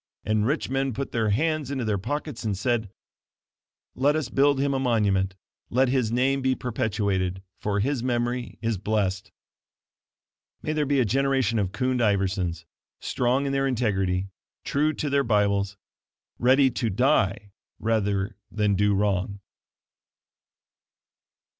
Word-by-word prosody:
And 110 +1 +1
rich 150 +4 0
men 135 -2 -1
put 140 +1 -4
their 110 -2 0
hands 155 +5 0
into 135 -4 -2
their 105 -2 0
pockets 145 +4 -4
and 105 -4 -1
said, 110 0 0 1.0
"Let 145 +4 +2
us 155 -6 -1
build 140 +1 +3
him 140 0 +1
a 135 - 0
monument; 100 -7 +1 0.3
let 130 +2 +3
his 125 -4 +1
name 135 +3 +2
be 130 0 +2
perpetuated, 100 -6 -1 0.2
for 100 -1 0
his 135 +2 0
memory 120 0 -2
is 115 -4 0
blessed." 95 -2 -1 1.3
May 155 - -1
there 150 -2 0
be 140 -1 +2
a 125 - +3
generation 130 -1 +1
of 95 -3 -1
Kund 125 +5 0
Iversons, 95 -5 0 0.3
strong 125 +3 0
in 140 - -1
their 135 0 +1
integrity, 95 -7 0 0.3
true 150 +2 +1
to 155 - -3
their 140 0 +2
Bibles 100 -3 +1 0.6
ready 130 +2 +4
to 115 -1 -1
die 105 -3 +1 0.3
rather 100 -3 0
than 105 -1 +1
do 100 +1 +2
wrong. 100 0 0
115 Hz, 140 wpm, -25 LUFS, 100-135 Hz, 1.3 s, ready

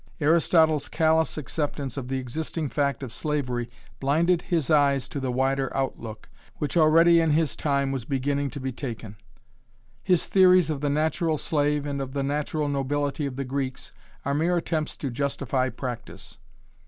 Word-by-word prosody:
Aristotle's 160 -1 +3
callous 160 0 +2
acceptance 145 -3 -3
of 130 -3 -5
the 135 +1 -2
existing 150 +4 -3
fact 140 -1 -1
of 120 -4 -6
slavery 125 -6 -2 0.3
blinded 165 +6 +2
his 165 -4 -1
eyes 140 -3 +3
to 140 - -4
the 130 -2 -2
wider 135 +2 0
outlook, 115 -5 -4 0.3
which 150 - -3
already 165 +1 +6
in 165 - +2
his 155 -2 +1
time 140 -2 0
was 135 -3 -3
beginning 140 +2 -1
to 140 - -7
be 130 0 -3
taken. 115 -5 -6 0.9
His 180 -3 +2
theories 185 -3 +5
of 145 -2 -4
the 145 - 0
natural 155 +2 +1
slave 145 -1 0
and 140 -1 -3
of 130 -1 -5
the 140 -1 -1
natural 150 +2 -1
nobility 145 +1 -1
of 130 - -6
the 135 0 -3
Greeks 130 0 -4 0.3
are 140 - 0
mere 170 +4 +1
attempts 160 -2 -2
to 135 - -4
justify 130 0 -1
practice. 125 - -7
145 Hz, 165 wpm, -26 LUFS, 135-155 Hz, 0.9 s, already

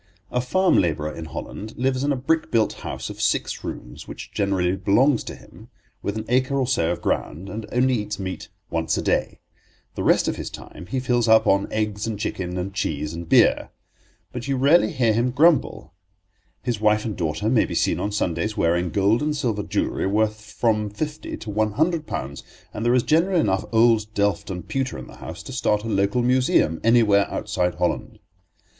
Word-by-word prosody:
A 125 - +1
farm 185 +8 +2
labourer 75 -3 -1
in 80 - -6
Holland 110 +6 -7
lives 130 +1 0
in 145 - +1
a - - +2
brick 160 +5 0
built 115 -5 +2
house - - -5
of - - -8
six - - 0
rooms, - - -7
which - - -9
generally 95 -2 0
belongs 110 +8 +3
to - - -6
him, - - -16 0.3
with 100 +1 -3
an 110 - -4
acre 130 +3 +1
or 135 - +1
so 120 -10 +1
of 85 - -4
ground, 90 +6 -2
and 105 +2 -6
only 130 +1 +2
eats 105 -3 -2
meat 95 -1 -6 0.2
once 80 -1 0
a - - 0
day. - - -1 0.5
The - - -5
rest - - +3
of - - -1
his - - -5
time 85 - -11
he 130 - -1
fills 120 -2 +1
up 110 0 +6
on 100 -1 +2
eggs 105 -1 -2
and 110 -2 -3
chicken 95 -4 -3
and 95 +2 -4
cheese 75 -5 -2
and 85 0 -7
beer. - - +4 0.6
But 125 +1 -6
you 135 -1 0
rarely 145 +9 +4
hear 125 -7 +2
him 120 +3 +1
grumble. 145 - +2 0.7
His 120 -4 -2
wife 105 0 +3
and 110 -3 -3
daughter 80 +4 -2
may 115 -1 +3
be - - -5
seen - - +1
on 105 - -2
Sundays 105 +2 -1
wearing 85 +1 +1
gold 100 - +2
and 150 0 -1
silver 115 -7 -1
jewellery 100 - -1
worth 110 +1 -1
from 110 -2 +1
fifty 150 +8 -5
to 110 - -7
one 110 0 0
hundred 160 +3 0
pounds, 70 -8 -5 0.3
and 105 - -4
there 120 +1 +3
is 125 - +3
generally 170 +3 +2
enough 95 -8 0
old 110 -2 +3
delft 100 -3 0
and 90 -1 -6
pewter 135 -1 -2
in - - -8
the - - -14
house - - -8
to 130 - -8
start 105 -5 +1
a - - -5
local 100 +3 +1
museum 125 -10 +2
anywhere 110 -4 +4
outside 90 -4 -1
Holland. - - -2
110 Hz, 200 wpm, -23 LUFS, 95-125 Hz, 0.7 s, up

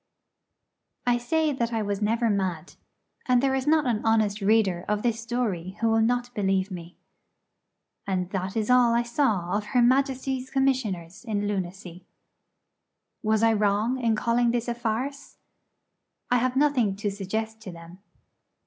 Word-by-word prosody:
I 240 0 +2
say 310 +5 0
that 235 -3 -2
I 225 -2 -1
was 200 0 -3
never 230 +3 +1
mad; 190 -5 -2 0.5
and 250 -1 +4
there 265 +1 +1
is 265 +1 -1
not 310 -1 +3
an 230 -4 0
honest 215 -2 +1
reader 195 -4 +2
of 210 0 -1
this 230 -2 0
story 210 -6 -3
who 230 - +2
will 225 0 +3
not 245 +2 0
believe 195 -2 0
me. 175 -1 -9 1.1
And 185 -2 -1
that 190 +1 -3
is 220 +2 0
all 245 -2 +5
I 235 - +2
saw 225 -8 0
of 210 - -1
her - - +6
Majesty's 260 0 +1
Commissioners 220 -10 -1
in 205 -3 -2
Lunacy. 185 -2 -5 1.1
Was 220 0 +1
I 225 0 +5
wrong 210 +4 +1
in 230 -3 +1
calling 235 +2 +1
this 240 0 -1
a 240 - 0
farce? 240 +4 -4 0.9
I 245 - +5
have 255 +1 0
nothing 265 -8 +2
to 205 0 -2
suggest 220 +3 -4
to 195 - -8
them. 170 +2 -12
225 Hz, 155 wpm, -26 LUFS, 195-245 Hz, 1.1 s, her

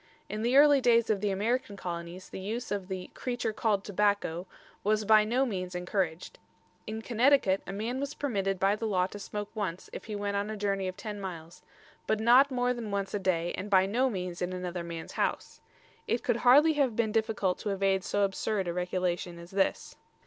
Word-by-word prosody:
In 210 +2 -3
the 245 +4 +3
early 285 -1 +7
days 235 -2 +4
of 200 -3 0
the 210 - +1
American 210 +2 -1
Colonies 175 0 -6
the - - -7
use 225 +6 -4
of 200 -3 -2
the 185 -1 -6
"creature 245 -3 -3
called 210 -2 0
Tobacko" 200 -4 0 0.4
was 215 +1 +1
by 215 0 +6
no 245 +5 +1
means 185 -6 -4
encouraged. 180 -2 -2 0.5
In 220 +1 -5
Connecticut 235 -5 +3
a - - -4
man 225 +6 -3
was 280 +1 -4
permitted 195 -8 -1
by 195 +2 +3
the 225 +1 -3
law 185 -4 +2
to 205 +2 -8
smoke 205 +1 -5
once 190 -5 -4
if - - -7
he 215 - -5
went 205 0 -2
on 200 +1 -1
a 215 - -4
journey 195 -2 -1
of 185 +1 -5
ten 210 -2 -6
miles, 170 -3 -8 0.5
but 220 - +1
not 245 +5 +6
more 250 -1 +1
than 235 -3 -6
once 200 -1 -2
a 205 - 0
day 175 -3 0
and 200 +3 -5
by 190 -2 +5
no 245 +7 +1
means 180 -5 -4
in 180 +1 -2
another 180 -1 -4
man's 170 -1 -7
house. - - -2 0.5
It 235 - 0
could 230 - +1
hardly 285 +7 +6
have 275 -6 +1
been 220 -1 +1
difficult 215 -4 0
to 210 - -3
evade 195 -1 +1
so 205 0 0
absurd 195 0 -1
a 170 - -1
regulation 180 -1 -2
as 170 +1 -11
this. 195 0 -1
205 Hz, 205 wpm, -29 LUFS, 185-225 Hz, 0.5 s, early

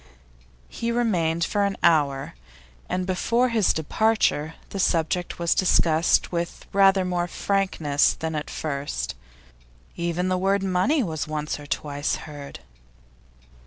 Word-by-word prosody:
He 230 0 -3
remained 175 -9 +1
for 205 +4 0
an 200 -1 -1
hour, 145 -2 +2 0.6
and 180 0 -1
before 230 +7 +1
his 220 -5 +3
departure 160 -2 +1 0.2
the 195 - -4
subject 175 0 0
was 170 -1 +1
discussed 165 -3 +3
with 170 -1 -4
rather 195 -1 +5
more 175 -1 -1
frankness 175 -7 +1
than 160 0 -4
at 150 -1 -4
first; 145 -2 -3 0.8
even 170 +1 -1
the 185 0 0
word 195 +1 +1
'money' 195 - +2
was 160 -6 -3
once 150 -1 -3
or 145 - -10
twice 145 0 -2
heard. 145 -2 -9
175 Hz, 125 wpm, -24 LUFS, 155-195 Hz, 0.8 s, rather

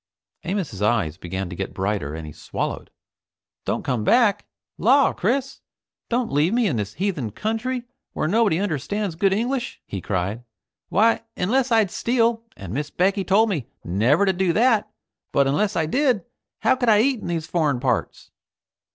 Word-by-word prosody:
Amos's 175 - -3
eyes 105 -8 +1
began 95 +1 -4
to - - -5
get 95 +2 -5
brighter 95 -7 -2
and 80 -1 -6
he 75 - -9
swallowed. - - -4 0.8
"Don't - - -1
come 125 -5 -1
back? 230 - +3 0.3
Law! 270 +6 +4
Chris, 265 +7 -1 0.5
don't 240 -1 0
you - - -8
leave 155 +9 +2
me 245 -1 +3
in 150 - 0
this 105 -1 -4
heathen 180 - -1
country 225 - -2 0.3
where - - -1
nobody 205 -2 +3
understands 195 - -2
good 190 +4 +2
English!" 245 +5 -1
he 95 - -5
cried. 100 +5 -2 0.5
"Why, 225 +4 +3 0.2
unless 250 +7 +1
I'd 220 -5 +3
steal, 230 -1 +1 0.2
and 95 -1 -7
Miss 145 +3 -2
Becky 195 +2 +1
told 215 +4 +3
me 150 - -2 0.2
never 115 - +2
to 190 - +2
do 180 -1 +1
that 225 0 +3 0.4
but 140 - +3
unless 200 +10 +1
I 160 - +1
did, 250 - +1 0.4
how 260 - +4
could 245 -2 +1
I 210 -1 +6
eat 260 0 +1
in - - -7
these 165 -2 -2
foreign 155 -6 0
parts?" 125 -3 -2
190 Hz, 170 wpm, -23 LUFS, -, 0.8 s, I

